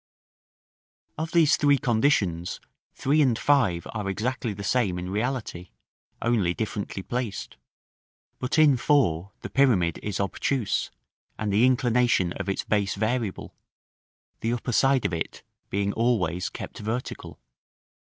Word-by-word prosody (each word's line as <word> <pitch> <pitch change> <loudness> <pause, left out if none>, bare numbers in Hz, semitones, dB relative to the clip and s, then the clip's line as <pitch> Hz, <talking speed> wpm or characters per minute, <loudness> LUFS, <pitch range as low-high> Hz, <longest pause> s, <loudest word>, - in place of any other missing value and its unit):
Of 160 +1 -3
these 165 -3 +4
three 145 -1 +4
conditions, 110 - +1 0.4
3 150 +3 +2
and 125 -6 +3
5 115 -14 +2
are 105 -3 -3
exactly 115 +4 -2
the 100 0 -7
same 100 -5 +1
in 90 +1 -5
reality, 110 -5 -3 0.5
only 105 -7 +1
differently 100 -3 -4
placed; 120 -2 -4 0.8
but 130 +4 -1
in 150 -4 +6
4 100 - +2
the - - -6
pyramid 110 -12 +3
is 105 -3 -3
obtuse, 100 +4 -1 0.5
and 105 -2 -2
the 115 +5 +5
inclination 120 -7 +2
of - - -4
its 95 - -1
base 100 -2 0
variable, 110 -1 -2 0.9
the 115 +1 -1
upper 120 +1 -3
side 135 +2 +3
of - - 0
it 80 - -4 0.3
being 100 0 -1
always 95 -7 0
kept - - -8
vertical. 115 +4 -5
110 Hz, 130 wpm, -26 LUFS, 95-130 Hz, 0.9 s, in